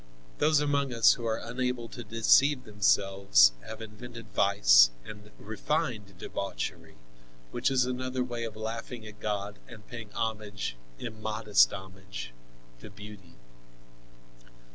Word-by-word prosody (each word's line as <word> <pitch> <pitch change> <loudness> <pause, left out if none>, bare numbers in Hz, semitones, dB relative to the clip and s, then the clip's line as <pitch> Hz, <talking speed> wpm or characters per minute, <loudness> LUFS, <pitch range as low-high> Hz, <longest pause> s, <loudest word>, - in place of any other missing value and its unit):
Those 155 -1 +4
among 140 -2 0
us 115 -2 +6
who 120 -2 -5
are 110 0 0
unable 125 0 -3
to 120 - -8
deceive 125 +5 +4
themselves 95 - +4 0.2
have 110 +1 -7
invented 115 +1 -10
vice - - +6 0.2
and 105 0 -10
refined 110 - -3
debauchery, 95 - -5 0.6
which - - +1
is 130 -2 +2
another 130 0 -2
way 120 -2 -4
of 115 -2 -5
laughing 115 +1 -6
at 105 -1 -11
God 105 -1 -3
and 110 -3 -13
paying 115 -2 -8
homage, 105 - -3 0.2
immodest 110 - +2
homage, 95 -8 -8 0.5
to - - -11
beauty. 105 -3 -12
110 Hz, 120 wpm, -29 LUFS, 100-120 Hz, 0.6 s, us